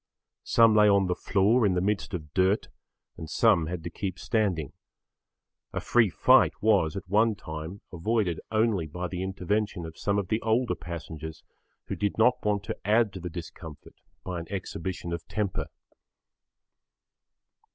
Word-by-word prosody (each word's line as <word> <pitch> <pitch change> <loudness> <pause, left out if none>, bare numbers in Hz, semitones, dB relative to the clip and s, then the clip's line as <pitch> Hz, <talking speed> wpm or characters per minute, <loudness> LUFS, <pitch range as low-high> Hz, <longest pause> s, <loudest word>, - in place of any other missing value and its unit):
Some 115 -2 +5
lay 105 -1 +6
on 100 -1 +4
the 90 - 0
floor 105 +6 +2
in 95 -4 +3
the - - +2
midst 100 0 -1
of 75 -4 -8
dirt 95 +3 +2 0.5
and 80 - -7
some 80 +1 +3
had 85 -1 -5
to - - -5
keep 95 -3 -4
standing. 95 - -1 1.0
A - - -1
free 115 -4 +3
fight - - +5
was, 100 -6 +2
at 95 - -6
one 110 +3 +3
time, 80 +1 -7
avoided 90 -1 0
only 110 -6 +1
by 90 +4 -4
the 90 0 -5
intervention 95 0 -2
of 80 0 -10
some 100 0 0
of 100 -2 -2
the 110 - 0
older 115 +2 +1
passengers 80 -1 -7 0.4
who - - -4
did 105 -1 -1
not 125 +3 +3
want 105 -1 0
to 110 +1 -5
add 110 0 +3
to 95 - -6
the 90 0 -5
discomfort 80 -2 -9 0.3
by 90 -2 -4
an 85 - -8
exhibition 90 -2 -4
of 85 - -6
temper. 105 -3 -2
95 Hz, 160 wpm, -27 LUFS, 85-105 Hz, 1.0 s, lay